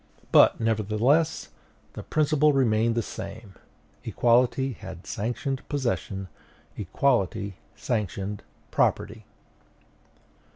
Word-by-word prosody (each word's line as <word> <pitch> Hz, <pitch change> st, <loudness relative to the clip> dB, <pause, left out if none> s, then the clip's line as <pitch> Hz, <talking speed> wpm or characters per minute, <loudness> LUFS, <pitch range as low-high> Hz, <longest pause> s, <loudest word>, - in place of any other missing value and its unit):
But, -, -, +6 dB
nevertheless, 115 Hz, +8 st, +1 dB, 0.4 s
the -, -, -7 dB
principle 150 Hz, -1 st, +2 dB
remained 115 Hz, -3 st, +2 dB
the 115 Hz, -, 0 dB
same: 105 Hz, 0 st, -8 dB, 0.5 s
equality 125 Hz, +2 st, +2 dB
had 95 Hz, -4 st, -10 dB
sanctioned 125 Hz, +5 st, -3 dB
possession; 95 Hz, -, -2 dB, 0.5 s
equality 100 Hz, -2 st, 0 dB, 0.2 s
sanctioned 105 Hz, -3 st, -3 dB, 0.3 s
property. -, -, 0 dB
115 Hz, 80 wpm, -26 LUFS, 100-135 Hz, 0.5 s, But